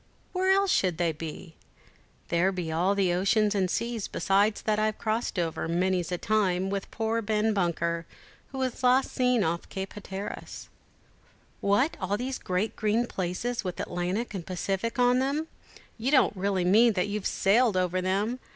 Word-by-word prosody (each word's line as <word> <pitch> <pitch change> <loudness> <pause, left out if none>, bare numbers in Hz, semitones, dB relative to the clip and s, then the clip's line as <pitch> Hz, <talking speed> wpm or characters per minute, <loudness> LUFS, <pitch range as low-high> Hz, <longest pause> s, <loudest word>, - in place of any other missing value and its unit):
where 375 0 +1
else 390 0 +4
should 180 -4 +2
they 170 -1 +1
be? 160 +1 -8 0.8
There 175 +3 +2
be 180 -4 -4
all 180 +5 +1
the 190 -3 +2
oceans 205 +3 +2
and 190 -3 +1
seas 230 +1 -2
besides 205 +2 +1
that 215 -1 +1
I've 215 0 0
crossed 220 -1 -2
over, 165 -2 -1
many's 175 0 0
the 180 - -1
time, 195 -2 +1
with 200 -1 -3
poor 225 0 -1
Ben 215 0 +1
Bunker, 170 -3 -1 0.4
who 270 - -7
was 260 -2 -2
last 255 +1 +3
seen 250 -3 +2
off 170 0 -2
Cape 190 0 -5
Hatteras." 200 -1 -7 0.9
"What, 230 +10 +2
all 195 +2 0
these 255 +2 -3
great 185 +4 -2
green 215 +3 +1
places, 205 +5 -3
with 180 -2 -5
Atlantic 180 +7 -2
and 190 -4 -4
Pacific 195 +6 -3
on 250 0 +4
them; 280 +4 0 0.5
you 240 +4 0
don't 270 -6 +4
really 190 -1 0
mean 220 +5 +5
that 185 0 0
you've 205 -1 -2
sailed 215 +1 +3
over 185 0 +1
them! 200 +7 0
200 Hz, 170 wpm, -28 LUFS, 180-230 Hz, 0.9 s, mean